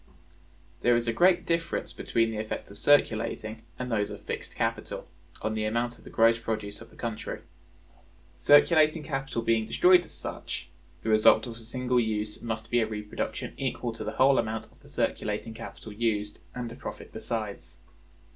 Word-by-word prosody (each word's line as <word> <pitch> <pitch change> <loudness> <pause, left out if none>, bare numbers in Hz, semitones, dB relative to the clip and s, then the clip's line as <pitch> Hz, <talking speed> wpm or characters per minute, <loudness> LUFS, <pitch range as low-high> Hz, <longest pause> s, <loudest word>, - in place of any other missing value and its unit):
There 120 0 +5
is 120 0 0
a 115 - +2
great 180 +6 +4
difference 170 0 -1
between 115 -1 +1
the 110 - -3
effects 110 -2 -4
of 100 - -4
circulating 110 -5 +2 0.2
and 125 -1 -4
those 105 -2 +1
of - - -8
fixed - - -5
capital, - - -2 0.4
on 110 - 0
the 110 0 -1
amount 120 +2 -1
of - - -18
the - - -11
gross 115 +1 +4
produce 110 -2 -3
of 115 - -11
the - - -19
country. 115 -3 -4 0.9
Circulating 150 - +5
capital 135 -5 -2
being 115 -1 +2
destroyed 180 0 +6
as - - -12
such, 85 - -5 0.3
the 110 - -1
result 110 0 +6
of 115 -2 -7
a - - -10
single 125 +2 0
use 105 -2 -1
must 110 -1 -4
be 120 - +4
a 110 - +2
reproduction 105 -1 -4
equal 125 -3 -2
to 115 - -6
the - - -3
whole 135 +1 +5
amount 110 0 -3
of - - -24
the - - -15
circulating 115 - -1
capital 110 -1 -9
used, 105 -2 -1 0.2
and 120 -2 -4
a - - -8
profit - - -8
besides. 100 -7 -4
115 Hz, 180 wpm, -28 LUFS, 110-125 Hz, 0.9 s, destroyed